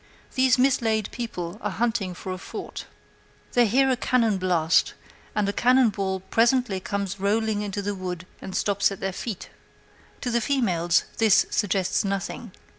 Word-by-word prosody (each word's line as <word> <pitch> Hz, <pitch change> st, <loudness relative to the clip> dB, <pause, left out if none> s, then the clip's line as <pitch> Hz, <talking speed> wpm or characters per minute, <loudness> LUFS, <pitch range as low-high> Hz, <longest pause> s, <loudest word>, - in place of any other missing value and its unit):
These 260 Hz, -1 st, +4 dB
mislaid 230 Hz, -5 st, +2 dB
people 195 Hz, -5 st, -5 dB
are -, -, -1 dB
hunting 220 Hz, -6 st, -1 dB
for 185 Hz, -, -6 dB
a 185 Hz, -, -5 dB
fort. -, -, -7 dB, 0.6 s
They 240 Hz, -1 st, +4 dB
hear 265 Hz, +5 st, +3 dB
a -, -, +3 dB
cannonblast, 185 Hz, -10 st, +2 dB, 0.4 s
and 210 Hz, -1 st, +1 dB
a 200 Hz, -, -1 dB
cannon 250 Hz, +2 st, +4 dB
ball 190 Hz, -2 st, -2 dB
presently 230 Hz, 0 st, +2 dB
comes 200 Hz, 0 st, -3 dB
rolling 210 Hz, +1 st, +1 dB
into 205 Hz, 0 st, -3 dB
the 205 Hz, +1 st, -1 dB
wood 185 Hz, -2 st, -5 dB, 0.2 s
and 190 Hz, -, -7 dB
stops 200 Hz, 0 st, +2 dB
at 195 Hz, -, -6 dB
their 195 Hz, 0 st, -2 dB
feet. 205 Hz, 0 st, -6 dB, 0.7 s
To 245 Hz, -, -2 dB
the 235 Hz, 0 st, +1 dB
females 185 Hz, -10 st, +2 dB, 0.2 s
this 220 Hz, -3 st, +5 dB
suggests 190 Hz, -2 st, +1 dB
nothing. 195 Hz, +2 st, -3 dB
205 Hz, 155 wpm, -25 LUFS, 190-235 Hz, 0.7 s, this